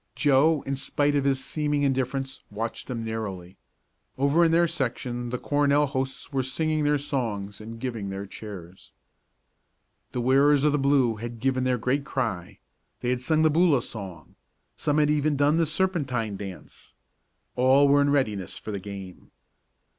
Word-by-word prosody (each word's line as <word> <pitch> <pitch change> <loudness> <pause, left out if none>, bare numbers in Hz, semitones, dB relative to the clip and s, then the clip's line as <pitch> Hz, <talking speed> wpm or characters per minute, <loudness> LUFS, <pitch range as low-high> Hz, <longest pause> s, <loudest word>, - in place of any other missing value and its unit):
Joe, 145 +1 +3
in 135 - -2
spite 145 +2 0
of 140 -1 +1
his 135 -1 +1
seeming 150 -2 -1
indifference, 135 0 -1
watched 115 +3 -5
them 120 -3 -4
narrowly. 100 -5 -5 0.6
Over 140 +5 +3
in 165 - +4
their 170 +1 +4
section 120 -3 -3
the 125 - -2
Cornell 145 +2 +2
hosts 130 +1 -4
were 135 - +1
singing 155 +4 -1
their 145 0 +3
songs 110 -8 -3
and 115 +1 -9
giving 115 -5 -4
their 95 +1 -5
cheers. 95 -3 -10 1.2
The - - -3
wearers 135 +3 +4
of 150 - +4
the 150 - +1
blue 135 -5 +2
had 115 +1 -7
given 130 +1 0
their 125 -1 +2
great 125 +5 0
cry 105 -9 -3 0.4
they 125 - 0
had 125 -1 -1
sung 155 +4 +2
the 155 - +4
Boola 155 -6 +3
song 95 -8 -9 0.4
some 145 0 0
had 150 -1 +3
even 150 0 +1
done 145 +3 +3
the 165 -1 +2
serpentine 140 - -1
dance. 95 -2 -10 0.6
All 130 +3 +5
was 145 +1 +5
in 145 - +2
readiness 110 -10 0
for 110 - -7
the 100 - -3
game. 95 -2 -9
130 Hz, 165 wpm, -26 LUFS, 110-145 Hz, 1.2 s, All